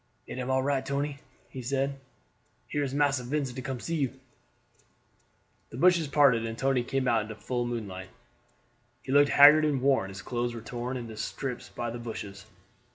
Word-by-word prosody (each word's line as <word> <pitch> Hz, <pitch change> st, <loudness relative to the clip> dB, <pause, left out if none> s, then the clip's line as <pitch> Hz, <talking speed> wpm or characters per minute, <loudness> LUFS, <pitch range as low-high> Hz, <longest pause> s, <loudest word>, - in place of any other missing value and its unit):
"It -, -, -7 dB
am 125 Hz, 0 st, -3 dB
all 130 Hz, 0 st, +2 dB
right, 140 Hz, -1 st, 0 dB
Tony," 140 Hz, 0 st, -2 dB, 0.3 s
he 130 Hz, -, -6 dB
said; 135 Hz, +2 st, -1 dB, 0.7 s
"here 145 Hz, -, -2 dB
is 140 Hz, -2 st, -1 dB
Massa 140 Hz, -2 st, +1 dB
Vincent 130 Hz, -1 st, -3 dB
come 135 Hz, 0 st, -3 dB
to -, -, -12 dB
see 165 Hz, 0 st, -1 dB
you." 135 Hz, -2 st, -2 dB, 1.5 s
The 115 Hz, -, -9 dB
bushes 170 Hz, +1 st, +4 dB
parted 135 Hz, -5 st, +4 dB
and 115 Hz, 0 st, -4 dB
Tony 135 Hz, -1 st, +1 dB
came 135 Hz, +1 st, -1 dB
out 115 Hz, -3 st, +3 dB
into 105 Hz, +1 st, -7 dB
the -, -, -22 dB
full 120 Hz, +2 st, -2 dB
moonlight. 100 Hz, -6 st, -5 dB, 0.9 s
He 130 Hz, -, -5 dB
looked 145 Hz, +1 st, +5 dB
haggard 150 Hz, +2 st, +8 dB
and 150 Hz, -3 st, +1 dB
worn; 130 Hz, -7 st, +2 dB
his 95 Hz, +1 st, -9 dB
clothes 120 Hz, -1 st, -2 dB
were 115 Hz, -, -6 dB
torn 120 Hz, +3 st, -4 dB
into 115 Hz, -3 st, -7 dB
strips 125 Hz, +2 st, -4 dB
by 120 Hz, -1 st, -4 dB
the 120 Hz, -, -6 dB
bushes. 100 Hz, -4 st, -7 dB
130 Hz, 185 wpm, -28 LUFS, 120-140 Hz, 1.5 s, haggard